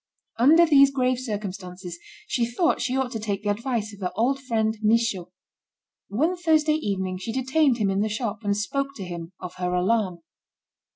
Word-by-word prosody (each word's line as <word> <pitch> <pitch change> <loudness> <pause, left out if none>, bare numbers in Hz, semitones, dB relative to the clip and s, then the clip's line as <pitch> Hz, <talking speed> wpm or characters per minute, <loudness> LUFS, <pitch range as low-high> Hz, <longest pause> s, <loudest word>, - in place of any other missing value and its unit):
Under 315 +8 +7
these 275 -3 +6
grave 255 -2 0
circumstances, 190 -6 -6 0.3
she 245 - -1
thought 335 +9 +1
she 255 +1 0
ought 265 -2 -1
to 225 - -4
take 205 -1 -3
the 205 - +1
advice 220 -1 -2
of 200 - -12
her 180 - -2
old 260 +6 +1
friend 220 -4 0
Michaud. 215 -5 +1 0.8
One 310 - 0
Thursday 315 -3 +2
evening, 190 -10 -2
she 210 +4 -4
detained 265 +1 +2
him 205 -4 +1
in 195 - 0
the 215 - 0
shop, 215 -1 -3
and 200 0 0
spoke 275 +7 -2
to 200 - -6
him 170 0 -7
of 180 -1 -7
her 180 0 -1
alarm. 185 -2 0
220 Hz, 180 wpm, -25 LUFS, 195-265 Hz, 0.8 s, Under